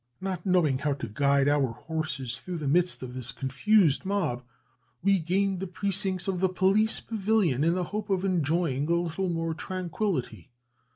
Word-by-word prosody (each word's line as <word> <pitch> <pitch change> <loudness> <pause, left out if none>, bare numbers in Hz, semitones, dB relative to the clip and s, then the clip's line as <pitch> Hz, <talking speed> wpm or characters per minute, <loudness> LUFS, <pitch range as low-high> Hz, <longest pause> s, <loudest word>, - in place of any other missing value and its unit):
Not 190 -1 -4
knowing 165 -8 +3
how 145 0 0
to 130 -4 -5
guide 140 +5 +2
our 140 -4 +2
horses 155 -4 -4
through 180 +4 -6
the 150 -3 -4
midst 175 +1 +2
of 125 -1 -7
this 125 -2 -3
confused 145 - +2
mob, 185 -11 -1 0.6
we 195 0 +4
gained 190 +3 0
the 195 - -4
precincts 190 0 -1
of 190 -2 -1
the 190 0 +2
police 195 +4 +3
pavilion 200 - +1
in 165 +2 +2
the 185 - 0
hope 210 +3 -5
of 190 -1 0
enjoying 160 -4 0
a 170 - +3
little 175 +2 -1
more 165 -1 -1
tranquillity. 180 - -3
175 Hz, 170 wpm, -27 LUFS, 145-190 Hz, 0.6 s, we